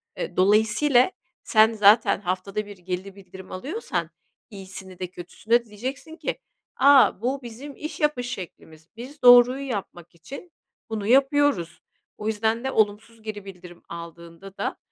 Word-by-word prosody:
E, - - -6
dolayısıyla 220 - +3 0.3
sen 220 +1 +4
zaten 210 0 +4
haftada 190 +3 -3
1 205 -2 -11
geri 185 +2 -6
bildirim 190 -1 -13
alıyorsan, 295 - -4 0.4
iyisini 190 -2 -9
de 180 - -3
kötüsünü 180 +5 -6
de 240 0 +4
diyeceksin 260 +9 -7
ki, - - -4 0.4
"A, 275 -7 +5
bu 265 +3 -2
bizim 255 +5 -9
iş 305 - -7
yapış 295 -5 0
şeklimiz. 160 -4 -9
Biz 270 +5 -10
doğruyu 245 +3 +7
yapmak 175 -6 -6
için 280 - -11 0.4
bunu 215 -2 -4
yapıyoruz." 270 - +2 0.4
O 210 - -4
yüzden 220 +2 0
de 265 - -2
olumsuz 220 +2 -1
geri 210 -2 -7
bildirim 180 -2 -12
aldığında 170 +3 -10
da, - - -3
215 Hz, 140 wpm, -24 LUFS, 185-255 Hz, 0.4 s, doğruyu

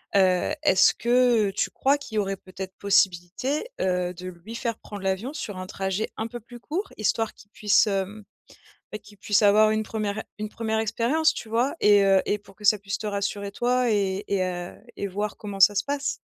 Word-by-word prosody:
heu, 185 -2 +3
est-ce 190 -11 +5
que 240 -4 +3
tu - - -1
crois 280 +2 +1
qu'il 235 -6 -9
y - - 0
aurait 195 -1 -1
peut-être 190 0 -8
possibilité, 200 - +1
heu, 180 -1 0
de 180 +2 -8
lui 185 +5 -9
faire 235 -2 -3
prendre 205 -2 -9
l'avion 195 +7 -1
sur 215 - -6
un 185 0 -6
trajet 195 +1 -2
un 220 - -2
peu 240 +1 -6
plus 240 +2 -13
court? 365 - -4
Histoire 220 +1 0
qu'il 205 - -19
puisse, 210 0 +3
hem, 200 +1 -3 0.7
beh, 215 - -4
qu'il 205 0 -17
puisse 205 +1 +2
avoir 215 +1 +5
une 215 0 0
1re 215 -1 -3
une 215 0 -5
1re 220 -1 -1
expérience 260 +9 +1
tu 235 - -8
vois? 235 +5 +1
Et 205 -1 +6
heu, 195 -1 +5
et 205 - +1
pour 200 -1 -18
que 210 - -15
ça 210 +1 +5
puisse 200 0 -4
te 215 - -5
rassurer 200 0 -3
toi 245 +2 +1
et 200 -2 0
et 200 -2 +1
heu, 175 -1 -5 0.2
et 200 - -3
voir 205 +2 -4
comment 200 -2 -7
ça 205 +2 +7
se 205 - +1
passe? 285 +1 -2
210 Hz, 210 wpm, -25 LUFS, 195-230 Hz, 0.7 s, ça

